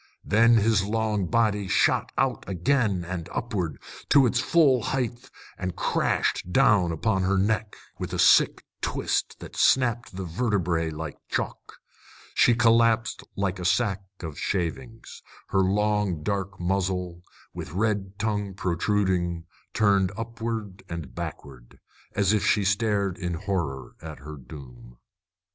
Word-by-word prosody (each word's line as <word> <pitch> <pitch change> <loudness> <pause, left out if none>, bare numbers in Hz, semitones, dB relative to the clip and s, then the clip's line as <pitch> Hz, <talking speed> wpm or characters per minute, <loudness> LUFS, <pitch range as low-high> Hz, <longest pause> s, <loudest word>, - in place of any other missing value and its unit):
Then 115 +2 +5
his 110 -2 +3
long 105 -2 -1
body 105 -3 +1
shot - - +2
out - - +1
again 95 -1 +1
and 85 -2 -5
upward, 100 -9 -3 0.3
to 140 -2 +6
its 120 - +1
full 140 -7 +4
height, 120 0 -3 0.3
and 90 -1 -3
crashed 90 - 0
down 105 -8 +4
upon 95 +4 0
her 95 +1 +1
neck, 105 +2 0 0.2
with - - -4
a - - -3
sick - - +4 0.2
twist - - -1
that - - -10
snapped 120 -5 +2
the 95 0 -4
vertebræ 85 -4 0
like 75 -1 -6
chalk. - - -4 0.6
She 120 - +4
collapsed 115 -1 +3
like 100 -1 -1
a - - -5
sack 95 +1 +1 0.2
of 80 -4 -6
shavings, 110 +7 -4 0.3
her 95 - +2
long 100 -3 +1
dark 100 +1 -3
muzzle, 90 -1 -1 0.3
with - - -7
red 100 -1 -1
tongue 105 -2 -2
protruding, 90 -2 0 0.3
turned 100 -3 +3
upward 115 -3 -5
and 85 -3 -6
backward, 60 -4 -8 0.4
as 100 0 +3
if 105 -2 +1
she 105 -1 +2
stared 100 -2 +1
in 90 -2 -2
horror 80 -9 -3
at 80 -1 -8
her 75 +4 -9
doom. - - -12
100 Hz, 135 wpm, -26 LUFS, 85-110 Hz, 0.6 s, to